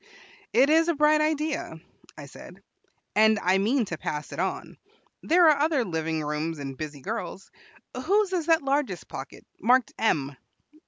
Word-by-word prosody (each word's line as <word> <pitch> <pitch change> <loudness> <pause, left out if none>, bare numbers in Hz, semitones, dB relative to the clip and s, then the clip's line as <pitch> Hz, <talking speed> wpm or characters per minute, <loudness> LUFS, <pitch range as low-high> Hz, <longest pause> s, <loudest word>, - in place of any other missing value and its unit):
"It 270 +5 +4
is 325 +1 +4
a 340 - +1
bright 300 +1 +4
idea," 310 +2 -1 0.4
I - - -9
said, - - -13 0.5
"and 220 +1 +5
I 190 -1 +2
mean 235 +5 +1
to 170 -4 -6
pass 150 0 -5
it - - -7
on. - - -3 0.4
There 345 +1 +4
are 305 -2 +5
other 295 -4 +1
living 160 -3 -2
rooms 150 +2 -3
and 135 -2 -6
busy 150 -1 -7
girls. 180 +7 -6 0.5
Whose 400 +2 +2
is 340 -3 -1
that 325 -3 +3
largest 275 -9 -1
pocket, - - -9
marked 250 -1 +2
M?" 145 -10 0
245 Hz, 160 wpm, -26 LUFS, -, 0.5 s, and